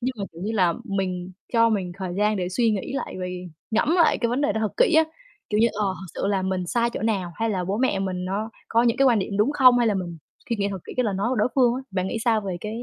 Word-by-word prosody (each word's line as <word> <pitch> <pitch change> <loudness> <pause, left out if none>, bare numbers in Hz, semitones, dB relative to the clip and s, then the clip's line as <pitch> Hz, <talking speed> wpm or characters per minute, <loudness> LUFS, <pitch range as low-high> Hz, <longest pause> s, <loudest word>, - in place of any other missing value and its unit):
Nhưng 255 +2 -1
mà, 200 - -2
kiểu 170 +2 -10
như 215 +3 -2
là, 180 -6 +2
mình 185 -2 -3 0.2
cho 230 -1 +5
mình 190 -5 -1
thời 185 -2 -4
gian 210 0 +2
để 180 -2 -2
suy 225 +5 +2
nghĩ 210 +4 -3
lại - - -4
về 180 0 -5 0.2
ngẫm 230 +7 +2
lại 335 - +4
cái 235 - 0
vấn 250 +4 0
đề 285 - +2
đó 220 - -2
thật 215 - -1
kỹ 485 -9 +4
á. 320 0 +6 0.5
Kiểu 210 0 +2
như, 230 - +6
ờ, 210 -1 -1 0.2
thực 190 - -8 0.2
sự - - +1
là 195 -2 +1
mình 185 -1 -2
sai 235 +4 +1
chỗ - - -5
nào, 195 -6 -1
hay 225 0 -1
là 185 -3 -1
bố 195 +3 -1
mẹ 255 -6 +1
mình 185 -2 -2
nó 205 +4 -3 0.2
có 230 +1 +3
những 235 -2 +2
cái 275 - +4
quan 235 -4 +4
điểm 200 +1 -3
đúng 215 +8 +2
không, 255 -4 +6
hay 240 - +3
là 210 - +2
mình 175 -3 -4 0.3
suy 230 - 0
nghĩ 200 0 0
thật 195 - -4
kỹ - - -8
cái 250 - +2
lời 205 - 0
nói 200 +5 0
của - - +1
đối 215 +2 +2
phương 245 -3 +4
á. 260 - -3
Bạn 185 -1 -1
nghĩ 225 - -2
sao 225 -2 +3
về 190 -3 -4
cái, 220 +3 -5
210 Hz, 310 wpm, -24 LUFS, 190-235 Hz, 0.5 s, á